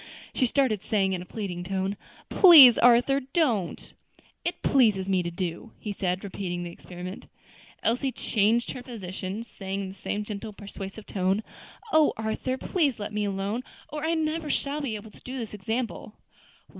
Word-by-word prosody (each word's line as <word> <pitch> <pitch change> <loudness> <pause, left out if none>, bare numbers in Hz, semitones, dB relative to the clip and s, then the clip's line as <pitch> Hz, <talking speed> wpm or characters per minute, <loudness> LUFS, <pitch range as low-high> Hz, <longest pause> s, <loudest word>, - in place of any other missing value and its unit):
She 255 - +2
started, 235 -6 +1
saying 195 -3 +1
in 180 - -2
a 180 - -10
pleading 185 -5 -5
tone, 190 +1 -2 0.3
"Please, 300 - +9
Arthur, 245 +3 +5
don't." 255 - -1 0.5
"It - - -3
pleases 215 -8 +3
me 190 -2 +2
to 170 - -3
do," 175 +4 -5
he 210 - -5
said, 185 -1 -2
repeating 180 -3 -4
the 175 - -6
experiment. 180 +2 -9 0.6
Elsie 250 +4 +1
changed 225 +1 +1
her 255 - -7
position, 200 -3 -6
saying 195 -3 -5
in 190 - -5
the - - -8
same 205 +2 -3
gentle, 210 0 -6
persuasive 200 +1 -8
tone, 190 +2 0 0.5
"O 315 -1 +5
Arthur! 220 +4 -2
please 295 - 0
let 210 0 -5
me 210 0 0
alone, 200 +4 -2 0.3
or 300 +1 -5
I 330 +1 +1
never 315 0 -1
shall 290 +1 -1
be 250 -6 -2
able 210 +1 -9
to - - -18
do 255 +1 -6
this 230 -4 -5
example." 220 +2 -4
210 Hz, 170 wpm, -27 LUFS, 190-255 Hz, 0.6 s, Please